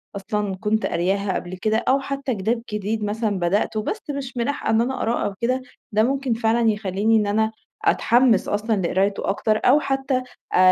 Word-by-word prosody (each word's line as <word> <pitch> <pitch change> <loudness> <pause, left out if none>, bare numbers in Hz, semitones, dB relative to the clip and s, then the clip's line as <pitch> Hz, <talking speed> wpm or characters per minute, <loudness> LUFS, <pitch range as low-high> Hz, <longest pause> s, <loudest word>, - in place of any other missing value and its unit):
أصلًا 200 0 -2
كنت 215 +3 0
قارياها 195 +3 0
قبل 180 +1 -5
كده 215 +3 +1
أو 270 +1 +4
حتى 275 -2 -3
كتاب 225 +4 -1
جديد 210 +1 -2
مثلًا 210 -1 -1
بدأته 205 +5 0
بس 430 - -3
مش 275 -3 -5
ملاحقة 245 +4 -1
إن 220 +1 +4
أنا 250 +3 0
أقرأه 230 +2 0
أو 200 - -2
كده، 255 +2 +1 0.3
ده 215 +1 +3
ممكن 265 0 0
فعلًا 225 0 +2
يخليني 210 +1 +1
إن 210 -1 +1
أنا 220 +2 +1 0.3
أتحمس 240 -4 +3
أصلًا 215 +2 0
لقرايته 195 +3 0
أكتر، 215 +2 +1
أو 275 +4 +6
حتى 270 -2 -1 0.3
أ - - +3
220 Hz, 180 wpm, -22 LUFS, 205-245 Hz, 0.3 s, أو